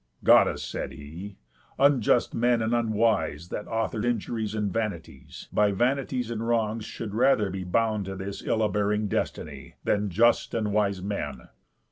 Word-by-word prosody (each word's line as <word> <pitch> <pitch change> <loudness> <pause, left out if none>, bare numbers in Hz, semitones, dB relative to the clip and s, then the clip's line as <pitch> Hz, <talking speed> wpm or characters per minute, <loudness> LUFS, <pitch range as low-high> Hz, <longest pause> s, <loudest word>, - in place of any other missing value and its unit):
"Goddess," - - +5
said - - -5
he, 85 +8 -9 0.4
"unjust 135 -4 +3
men, 120 -1 +2
and 110 +2 0
unwise, 110 -9 +1
That 105 - -5
author 115 -1 -2
injuries 110 -2 -2
and 105 -3 -1
vanities, 105 -11 -5
By 105 -1 +3
vanities 125 +2 0
and 115 0 -3
wrongs 115 -2 0
should 110 -3 -6
rather 110 -4 +3
be 95 0 -4
Bound 110 +2 0
to 95 0 -5
this 95 +1 -6
ill 110 -1 +1
abearing 105 0 0
destiny, 70 -7 -4
Than 105 0 +1
just 115 +7 +2
and 105 -3 -1
wise 100 -3 +1
men. 75 -11 -4
105 Hz, 150 wpm, -27 LUFS, 100-115 Hz, 0.4 s, Goddess